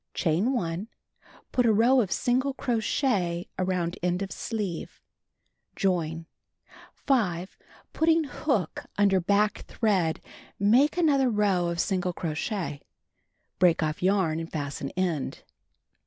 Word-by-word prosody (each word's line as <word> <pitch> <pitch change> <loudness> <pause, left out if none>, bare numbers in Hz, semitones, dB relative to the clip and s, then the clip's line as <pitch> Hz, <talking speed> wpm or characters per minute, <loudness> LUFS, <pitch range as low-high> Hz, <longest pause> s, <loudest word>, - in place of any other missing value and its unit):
Chain 175 +10 +1
1. 180 -3 -2 0.6
Put 250 -2 +2
a - - +5
row 240 +5 +5
of 195 -6 -3
single 260 +2 +1
crochet 220 -8 0
around 180 -2 -1
end 180 +2 0
of 195 - -6
sleeve. 205 -7 -4 0.8
Join. 165 -4 -1 0.7
5. 190 -10 0 0.4
Flitting 325 0 +3
hook 255 - -2
under 200 -2 +4
back 205 +3 +2
thread, 190 -8 +1 0.4
make 245 - +4
another 280 -6 +3
row 200 -5 +2
of 170 0 -3
single 180 0 0
crochet. 165 - -3 0.8
Break 175 -3 +4
off 155 0 -2
yarn 185 -4 +2
and 165 0 -6
fasten 145 -2 -4
end. 170 -7 -2
190 Hz, 115 wpm, -27 LUFS, 170-230 Hz, 0.8 s, a